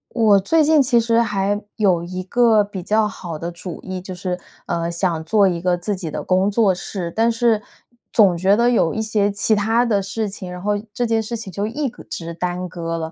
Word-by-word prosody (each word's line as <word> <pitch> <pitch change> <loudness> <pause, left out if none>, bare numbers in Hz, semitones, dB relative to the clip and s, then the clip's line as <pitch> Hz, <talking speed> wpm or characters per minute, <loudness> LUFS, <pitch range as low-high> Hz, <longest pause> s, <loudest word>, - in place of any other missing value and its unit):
我 215 -4 +5
最 315 +12 +3
近 305 0 +5
其 250 -3 +3
实 230 0 +2
还 205 -1 0
有 185 -6 +2
一 185 +1 -5
个 225 +1 +4
比 200 -2 -7
较 215 +4 +2
好 175 -6 -7
的 170 +2 -5
主 175 +1 -8
意， 185 -1 -5
就 185 0 -7
是， 180 0 -3 0.3
呃， 170 -1 -2
想 170 -2 -1
做 200 +4 +3
一 175 -2 -1
个 180 0 +1
自 200 +4 -2
己 180 -4 -5
的 155 - -5
工 185 +2 +2
作 205 -2 +3
室， 180 -1 -5
但 230 +1 +3
是 230 -2 +2 0.5
总 200 -6 +5
觉 190 +4 +3
得 240 +1 +3
有 170 -9 +2
一 - - -3
些 210 -2 +1
其 205 +2 +1
它 225 +3 +2
的 210 -4 +1
事 205 +3 -3
情， 195 -2 -7
然 180 - -7
后 210 - +1 0.2
这 240 +3 -1
件 225 -1 +1
事 230 +2 -4
情 205 -4 -8
就 205 +3 -2
一 280 +6 -2
个 245 - -10
直 170 0 -6
耽 180 +1 -3
搁 165 -1 -4
了， 160 0 -4
200 Hz, 245 characters per minute, -20 LUFS, 180-225 Hz, 0.5 s, 我